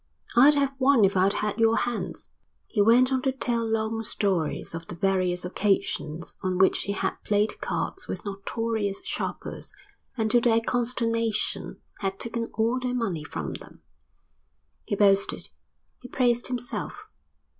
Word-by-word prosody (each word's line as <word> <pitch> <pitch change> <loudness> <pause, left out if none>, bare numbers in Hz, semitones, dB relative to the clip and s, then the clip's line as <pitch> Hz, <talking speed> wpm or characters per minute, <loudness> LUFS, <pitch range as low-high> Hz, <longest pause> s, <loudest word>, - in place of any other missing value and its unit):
"I'd 280 +5 +7
have 280 -1 +1
won 260 -5 +5
if 195 - +1
I'd 190 +2 +3
had 210 +1 -2
your 225 0 +4
hands." 240 -1 -3 0.4
He 210 - 0
went 240 +5 +5
on 260 - +1
to 265 - +1
tell 240 -3 -1
long 225 0 -1
stories 190 -9 -1
of 165 0 -6
the 175 - -6
various 180 -1 +1
occasions 180 -4 -1
on 185 -1 -1
which 190 +1 +4
he 200 - -2
had - - -2
played 210 +1 0
cards 385 - -3
with 180 - -5
notorious 205 +1 -2
sharpers - - -4 0.5
and 220 -2 0
to 240 - +5
their 230 -1 +4
consternation 230 -2 -1 0.2
had 195 -1 -2
taken 235 0 -3
all 230 +3 +1
their 250 0 -2
money 195 -11 -2
from - - -5
them. - - -11 1.0
He - - -1
boasted. 200 -1 +2 0.5
He 250 - -10
praised 245 -1 +1
himself. 245 -1 -4
225 Hz, 150 wpm, -26 LUFS, 195-240 Hz, 1.0 s, I'd